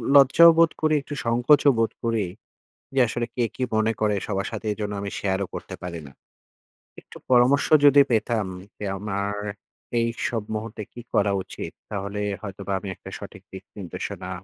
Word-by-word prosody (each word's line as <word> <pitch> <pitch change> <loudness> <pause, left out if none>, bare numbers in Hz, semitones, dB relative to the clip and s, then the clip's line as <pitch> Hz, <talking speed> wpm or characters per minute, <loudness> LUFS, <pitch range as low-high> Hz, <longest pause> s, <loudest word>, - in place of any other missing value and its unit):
লজ্জাও 140 +5 +8
বোধ 165 -1 +5
করি, 155 0 +3
একটু 145 - -8
সংকোচও 125 +5 +5
বোধ 115 - +2
করি। 115 -3 +1 0.7
যে - - +3
আসলে 120 +1 -2
কে 125 - +1
কি 130 - -2
মনে 110 +1 +2
করে! 105 -1 +2
সবার 95 -2 -1
সাথে - - -6
এইজন্য 105 0 -3
আমি 100 - -3
শেয়ারও 95 0 0
করতে - - -6
পারি 85 -2 -5
না। - - -13 0.9
একটু - - -14
পরামর্শ 130 +2 +5 0.2
যদি 145 0 +8
পেতাম, 110 -2 +1 0.3
যে - - -8
আমার 100 0 -2 0.7
এইসব 115 0 -1
মুহূর্তে 110 0 -5
কি 120 - -8
করা 100 0 +3
উচিত? 95 - -7 0.2
তাহলে 100 0 -4 0.2
হয়তোবা 100 -1 -5
আমি 100 - -8
একটা - - -11
সঠিক - - -10
দিকনির্দেশনা 95 -1 -7
110 Hz, 160 wpm, -24 LUFS, 100-125 Hz, 0.9 s, লজ্জাও